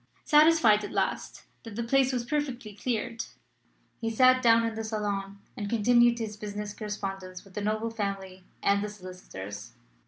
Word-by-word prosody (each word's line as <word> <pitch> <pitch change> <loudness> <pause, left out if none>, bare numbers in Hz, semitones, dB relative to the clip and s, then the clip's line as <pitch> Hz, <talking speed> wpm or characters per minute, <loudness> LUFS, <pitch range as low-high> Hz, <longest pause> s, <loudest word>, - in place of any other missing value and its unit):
Satisfied 300 -9 +5
at 205 - -5
last - - -2 0.2
that 225 -3 -9
the 235 - -2
place 265 +2 +3
was 245 -2 -2
perfectly 260 -6 -3
cleared, 230 +1 -3 0.7
he 225 - -1
sat 255 +3 +5
down 230 -1 +5
in 230 - -2
the 225 0 -4
salon 205 -2 -3 0.2
and 205 -5 -4
continued 240 +2 +4
his 220 -2 -4
business 210 0 -5
correspondence 195 -4 -5
with 195 - -18
the 210 - -4
noble 215 +2 -1
family 195 -4 -4 0.2
and 200 0 +3
the 210 - -3
solicitors. 180 - -9
215 Hz, 160 wpm, -28 LUFS, 200-235 Hz, 0.7 s, Satisfied